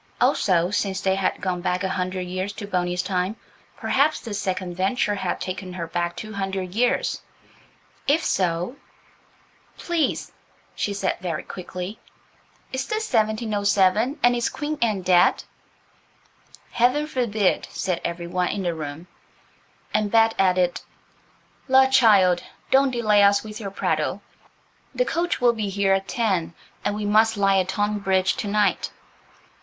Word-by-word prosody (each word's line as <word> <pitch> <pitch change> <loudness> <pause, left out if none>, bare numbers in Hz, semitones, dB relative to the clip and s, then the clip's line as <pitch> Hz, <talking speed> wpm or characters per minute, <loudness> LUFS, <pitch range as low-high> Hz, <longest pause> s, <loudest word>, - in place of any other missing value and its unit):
Also, 180 -2 +2
since 195 -1 -1
they 190 - +1
had 195 0 -1
gone 180 -2 -2
back 180 +1 -1
a 190 - 0
hundred 185 0 -2
years 185 +2 -4
to 205 - -7
Boney's 180 -2 -1
time, 185 +2 -1 0.4
perhaps 295 +3 +2
this 205 -4 -5
second 185 -2 -3
venture 195 +3 0
had 190 -3 -2
taken 185 0 -5
her 175 -2 -4
back 175 +1 -2
two 215 +4 -7
hundred 190 -2 -3
years. 245 +4 +1 0.9
If 315 +4 +3
so– 180 +7 0 1.0
"Please," 340 -4 -1 0.4
she 205 - -2
said, 195 -1 -1
very 170 -4 -3
quickly, 185 +2 -7 0.7
"is 260 0 -2
this 435 -6 -3
1707 215 +1 +2
and 245 0 +5
is 240 -1 0
Queen 300 0 -4
Anne 215 -5 +1
dead?" 180 -1 +4 1.3
"Heaven 250 +5 +2
forbid," 225 -9 0
said 180 -3 -2
every 170 0 -3
one 180 +1 -1
in 195 - -2
the 175 -1 0
room; 155 +1 -6 0.9
and 210 -1 +1
Bet 225 +1 +4
added, 180 -2 +2 0.9
"La, 265 0 +6
child, 210 -9 +5 0.3
don't 270 +1 +5
delay 215 -4 +3
us 200 0 +4
with 215 -1 -8
your 200 -3 -5
prattle. 195 - -1 0.7
The - - +2
coach 345 -3 -1
will 245 -2 +4
be 215 -3 -3
here 195 0 +2
at 195 0 0
ten, 190 -8 -1 0.3
and 205 - -1
we 210 0 -3
must 220 +1 +3
lie 195 -1 +3
at 185 0 -1
Tonbridge 195 -2 +1
to 210 - -3
night." 210 0 +1
200 Hz, 145 wpm, -23 LUFS, 185-225 Hz, 1.3 s, La